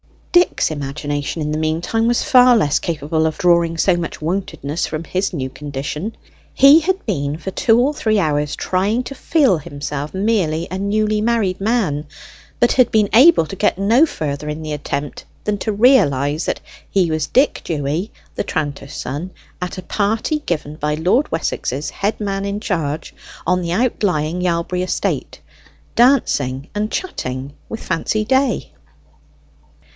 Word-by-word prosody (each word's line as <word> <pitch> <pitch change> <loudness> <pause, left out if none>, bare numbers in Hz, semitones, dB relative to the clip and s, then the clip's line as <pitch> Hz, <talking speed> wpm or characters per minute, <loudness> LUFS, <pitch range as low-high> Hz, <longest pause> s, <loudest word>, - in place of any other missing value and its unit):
Dick's 350 - +3
imagination 145 +1 -3
in 150 - -2
the 155 - -1
meantime 165 +9 0
was 240 0 +2
far 250 -1 +6
less 150 -9 +2
capable 160 0 -1
of 155 - -3
drawing 170 -2 +3
so 180 +2 +3
much 170 -1 -4
wontedness 160 -2 -2
from 155 +1 -4
his 185 +4 -1
new 130 -5 -3
condition. 150 - -5 0.4
He 280 +4 +7
had 375 +4 -1
been 145 -8 -2
for 190 +3 -6
two 225 +3 +3
or 275 +5 +2
three 220 -7 +1
hours 150 -5 0
trying 200 +7 0
to 275 - -7
feel 270 - +2
himself 145 0 -5
merely 190 -6 0
a 185 - -3
newly 210 +1 +1
married 215 -5 +1
man, 195 -10 0 0.5
but 240 - +4
had 255 -3 +4
been 215 -2 +3
able 265 - +7
to 195 - -7
get 205 -1 +1
no 225 +10 +4
further 150 - -4
in 150 +1 -5
the 155 - -5
attempt 145 0 -4 0.2
than 210 -1 -1
to 220 - -1
realize 155 - +3
that - - -2 0.3
he 180 -4 +2
was 155 -2 -1
Dick 270 +3 +2
Dewy, 155 +6 -2 0.2
the - - -2
tranter's 145 -2 -4
son, 150 +8 -5 0.3
at 180 +1 -4
a 185 - -6
party 220 - 0
given 155 -3 -3
by 150 0 -1
Lord 185 - +1
Wessex's 145 -3 -2
head 205 +2 -2
man 195 -1 -2
in 200 +1 -2
charge, 160 -7 -3 0.3
on 180 0 +2
the 170 -1 -2
outlying 180 -7 0
Yalbury 180 0 0
estate, 185 - -2 0.6
dancing 145 - +2
and 210 +1 -2
chatting 135 - -4 0.2
with 225 - -6
Fancy 210 +4 -1
Day. 260 - +1
180 Hz, 160 wpm, -19 LUFS, 150-215 Hz, 0.6 s, He